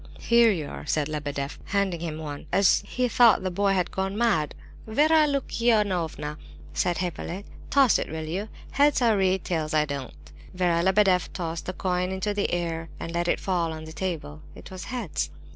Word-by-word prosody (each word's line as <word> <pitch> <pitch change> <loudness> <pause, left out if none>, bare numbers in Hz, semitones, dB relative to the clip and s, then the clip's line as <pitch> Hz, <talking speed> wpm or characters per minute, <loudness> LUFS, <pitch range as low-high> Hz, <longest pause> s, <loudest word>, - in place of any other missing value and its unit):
"Here 235 -1 +5
you 160 -7 -2
are," - - -8
said 150 0 +1
Lebedeff, 145 -2 -4
handing 195 -3 0
him 160 -2 -4
one; 150 -1 -7 0.4
he 250 +4 0
thought 235 -5 +5
the 185 - -1
boy 200 +2 +2
had 180 -2 0
gone 195 +1 -2
mad. 205 -11 +1 0.3
"Vera 305 +7 +4
Lukianovna," 210 - 0 0.3
said 175 -2 0
Hippolyte, 180 +2 -4 0.2
"toss 275 -5 +5
it, - - -4
will 160 +1 -4
you? 190 +7 -4 0.2
Heads, 285 0 +3
I 230 - +5
read, 190 -2 +1
tails, 155 -2 -2
I 150 0 +4
don't." 140 - -5 0.4
Vera 175 -2 +2
Lebedeff 190 -1 +3
tossed 165 -2 -4
the 185 - -2
coin 180 0 -1
into 190 +2 -2
the 205 0 -1
air 165 -2 -2
and 165 - -5
let 170 0 0
it - - +1
fall 175 -4 0
on 160 0 -7
the 160 0 -9
table. 160 -4 -4
It - - -12
was 185 -1 -7
"heads." 190 - -3
180 Hz, 180 wpm, -26 LUFS, 160-205 Hz, 0.4 s, Here